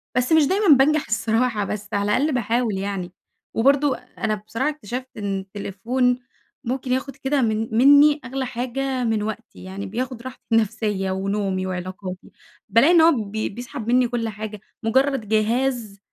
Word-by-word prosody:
بس 250 +2 +1
مش 320 -1 +6
دايمًا 400 +4 +1
بانجح 300 +3 +3
الصراحة 225 0 0
بس 210 +1 -5
على 200 - +1
الأقل 295 +3 +1
باحاول 235 -3 0
يعني. 190 -2 -4 0.4
وبرضو 275 +4 +3
أنا 220 -4 -4
بصراحة 225 +7 -2
اكتشفت 255 -3 -6
إن 200 -2 -2
التليفون 210 +6 -1 0.4
ممكن 260 +1 -3
ياخد 260 +2 -1
كده 275 +1 0
من 220 -1 0
مِنّي 285 +3 +6
أغلى 260 +1 -3
حاجة 255 +1 -2
من 220 -3 0
وقتي، 220 +2 -7
يعني 190 +2 -6
بياخد 245 +4 -4
راحتي 260 +1 -9
النفسيّة 210 -3 +1
ونومي 190 0 -1
وعلاقاتي، 185 0 -6 0.4
بالاقي 255 +9 +5
إن 335 - +7
هو 330 +1 +7 0.2
بي 220 +1 -2
بيسحب 235 0 -7
مِنّي 250 +1 +4
كل 230 -1 -2
حاجة. 215 0 -6 0.2
مجرّد 260 0 +1
جهاز 220 0 0
230 Hz, 155 wpm, -22 LUFS, 205-260 Hz, 0.4 s, إن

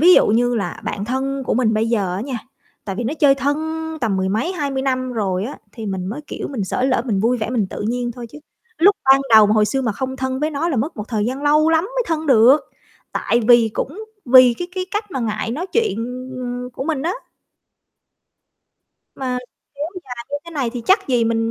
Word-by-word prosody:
Ví 355 +3 +8
dụ - - +5
như 245 +3 +2
là 200 -6 -3
bạn 200 - -3
thân 270 +3 -2
của - - +1
mình 225 -2 +2
bây 220 +1 +1
giờ 200 -6 0
á 190 - -3
nha, 255 +1 -4 0.5
tại 195 -2 -4
vì 240 - -3
nó 260 +7 -1
chơi 290 -3 +5
thân 280 +1 0 0.4
tầm 220 -6 0
mười 190 0 0
mấy, 225 - -1
20 280 -6 -2
năm 255 -1 -1
rồi 195 -4 -1
á, 265 - -6
thì 225 -3 -7
mình 190 -2 -3
mới, 225 +10 -4
kiểu, - - -5
mình 235 -8 -3
xởi 250 +6 -1
lởi, 255 -3 +1
mình 210 -7 0
vui 235 +4 +2
vẻ 220 0 -3
mình 230 -5 0
tự - - -5
nhiên 240 0 -2
thôi 240 0 -8
chứ. 295 - -11 0.4
Lúc 400 +4 +5
ban 270 0 +6
đầu 215 -1 +9
mà 210 - +2
hồi 215 -1 +4
xưa 270 +4 -1
mà 230 -4 0
không 260 +5 -4
thân 260 0 -2
với 305 +1 0
nó 305 +3 -1
là 300 - -1
mất 285 +9 -2
một 210 - -4
thời 215 -3 -1
gian 260 +3 -3
lâu 300 +2 +4
lắm 325 +1 +3
mới - - -2
thân 320 -1 -2
được. 260 +2 +6 0.5
Tại 235 - +1
vì 235 -2 +6
cũng 380 +11 -4 0.2
vì 255 -1 +7
cái 355 - -4
cái 370 -1 -2
cách 420 0 -3
mà 265 - -3
ngại 215 -1 -2
nói 310 +10 -3
chuyện, 455 0 +1
ừm, 250 +3 -5
ừm, 245 0 -5
của 255 - -6
mình 300 -3 -1
á. 340 +4 0 2.0
Mà 255 -2 -2 0.4
kéo 290 +2 -3 0.2
dài 240 -1 -8
như 285 - -1
thế 335 - -10
này 275 -7 -2
thì 245 -2 -5
chắc 390 -1 +3
gì 245 -3 +2
mình 225 0 0
255 Hz, 240 wpm, -20 LUFS, 225-285 Hz, 2.0 s, đầu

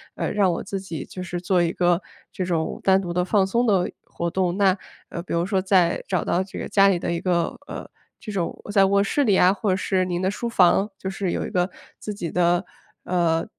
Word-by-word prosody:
呃， - - -2
让 200 -3 +3
我 170 - -3
自 195 0 -4
己， 170 -7 -6
就 185 - -8
是 175 0 -4
做 180 0 +2
一 170 - 0
个 175 0 +2 0.3
这 185 - -3
种 165 -3 -1
单 190 0 +5
独 175 -3 -4
的 180 +1 +1
放 195 0 +3
松 235 +6 +1
的 190 -4 +2
活 170 - -4
动。” 180 0 0
那， 195 -2 +4 0.3
呃， 170 - -5
比 175 - -6
如 170 +1 +1
说 190 -1 0
在 185 -3 +2
找 185 -3 0
到 175 - +1
这 190 - -10
个 - - -4
家 200 -1 +5
里 190 -3 +3
的 170 - -3
一 170 - -1
个 175 -2 0
呃， - - -7 0.3
这 215 - -7
种 185 -4 -3
在 195 -2 +6
卧 200 +1 +3
室 285 +8 +1
里 210 - +3
呀， 185 +1 +5
或 210 0 -2
者 185 - +3
是 185 -1 0
您 175 -1 -2
的 190 - +1
书 235 +3 -4
房， 195 0 +4
就 190 - -7
是 190 -1 -2
有 - - -2
一 - - -5
个 180 0 +1 0.3
自 210 - -5
己 175 -5 -5
的， 175 0 +2 0.4
呃 170 -2 +1
185 Hz, 260 characters per minute, -23 LUFS, 175-195 Hz, 0.4 s, 在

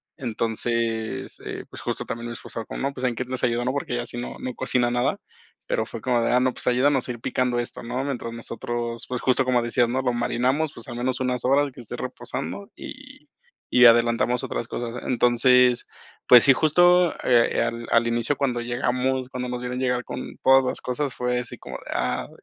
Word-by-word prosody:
Entonces 115 -1 -2
eh, - - -6
pues, - - -8
justo - - -3
también 115 +1 -5
mi 120 - -5
esposa 115 -1 -7
como - - -7
no 140 +1 -1
pues, 130 - -7
en 120 -2 0
qué 130 - -2
los 130 0 -5
ayudó, 120 0 +1
¿no?, 130 - +1
porque 140 -3 -3
ella 120 0 -2
si 120 - -4
no 120 - -6
no 125 - -4
cocina 120 -1 +1
nada, 125 +11 0 0.5
pero - - 0
fue - - -7
como 120 -2 +1
de: 115 - +1
"Ah, 125 - +4
no, 130 0 +1
pues, - - -4
ayúdanos 130 +1 +3
a - - 0
ir 120 - -7
picando 125 0 0
esto, 120 - -5
¿no?, 125 +3 -3
mientras 125 -4 -4
nosotros", 115 0 -4
pues, 125 -1 -3
justo 130 +1 +3
como 125 -1 +2
decías, 120 0 +1
¿no?, 130 +2 0
lo 125 -1 +1
marinamos, 130 +5 0
pues, 115 - -8
al 120 - -7
menos 125 +1 -1
unas 125 -2 -1
horas 140 +1 +3
que - - -15
esté 115 - -7
reposando 95 +5 -5
y - - -11 0.5
y 125 0 +8
adelantamos 120 +1 +3
otras 115 - -3
cosas. 120 0 -5
Entonces, 125 0 +4 0.4
pues 125 -2 +9
sí, 135 - +7
justo, 175 +4 +4
eh, 120 -2 +3
al 115 0 -4
al 115 0 +4
inicio 120 +4 0
cuando 125 -4 0
llegamos, 125 +2 -1
cuando 125 -1 -4
nos 125 0 -4
vieron 125 +1 -4
llegar 125 -1 0
con 125 - -7
todas 135 0 +6
las 130 - -2
cosas, 130 +1 -2
fue 125 0 0
así 125 - -6
como - - -8
de: - - -10
"Ah, - - -1
125 Hz, 215 wpm, -24 LUFS, 120-130 Hz, 0.5 s, pues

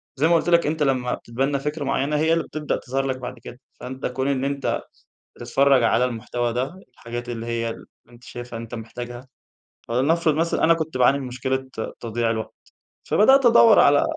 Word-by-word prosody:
زي 150 +4 +2
ما 170 - +4
قُلت 165 - +1
لك 170 -3 +4
أنت 155 0 0
لما 130 -3 0
بتتبنى 135 +4 -2
فكرة 150 +2 -3
معينة 140 +2 0
هي 160 +2 +2
اللي 165 -1 +1
بتبدأ 155 -1 -3
تظهر 135 +1 -3
لك 130 -1 -2
بعد 125 -1 -7
كده. 125 - -10 0.2
فأنت 130 +1 -7
كون 130 +2 -2
إن 135 -1 0
أنت 140 -1 -1 0.6
بتتفرج 135 -2 +3
على 115 +2 +3
المحتوى 120 0 -2
ده، 130 +8 -2 0.2
الحاجات 120 +1 -7
اللي 115 -1 -5
هي 115 -1 -2
اللي - - -9 0.2
أنت 120 +1 -18
شايفها 120 -1 -8
أنت 115 +1 -8
محتاجها. 120 +2 -8 0.6
فلنفرض 155 +6 +2
مثلًا 165 +2 0
أنا 165 +1 +6
كنت 160 -4 -4
باعاني 135 +3 +4
من 135 - -5
مشكلة 130 +1 -3 0.3
تضييع 115 0 -1
الوقت، 110 -1 -4 0.5
فبدأت 265 +5 +4
أدوّر 230 -2 +7
على 145 0 +5
130 Hz, 185 wpm, -23 LUFS, 120-150 Hz, 0.6 s, أدوّر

